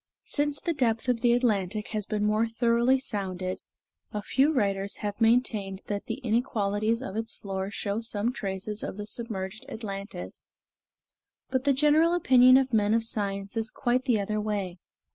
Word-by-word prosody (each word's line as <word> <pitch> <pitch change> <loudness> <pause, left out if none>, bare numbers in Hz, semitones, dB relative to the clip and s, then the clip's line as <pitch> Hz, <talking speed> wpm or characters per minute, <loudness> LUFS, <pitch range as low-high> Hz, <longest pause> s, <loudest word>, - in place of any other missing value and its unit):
Since 290 0 0
the 335 - -1
depth 230 -5 0
of 235 -2 +1
the 240 - +4
Atlantic 215 -4 0
has 215 -1 -3
been 210 -1 -1
more 215 +2 +2
thoroughly 235 +3 +3
sounded, 190 -7 -3 0.5
a 210 -1 -4
few 275 +7 +3
writers 200 -7 0
have 205 +2 -4
maintained 220 -4 +1
that 205 -1 -3
the - - -2
inequalities 225 -1 0
of 195 - -6
its 225 0 -3
floor 190 -1 -4
show 205 +1 -3
some 225 +1 -1
traces 200 -1 -4
of - - -5
the 210 - -5
submerged 215 -1 -5
Atlantis, 205 -3 -6 1.0
but 260 0 0
the 285 - +5
general 305 +5 +4
opinion 255 -6 +6
of 265 -2 +1
men 210 0 +3
of 230 - +1
science 200 -2 -2
is 225 -1 0
quite 250 +2 0
the 240 -5 +2
other 210 +1 -1
way. 200 -4 -3
220 Hz, 165 wpm, -28 LUFS, 200-245 Hz, 1.0 s, opinion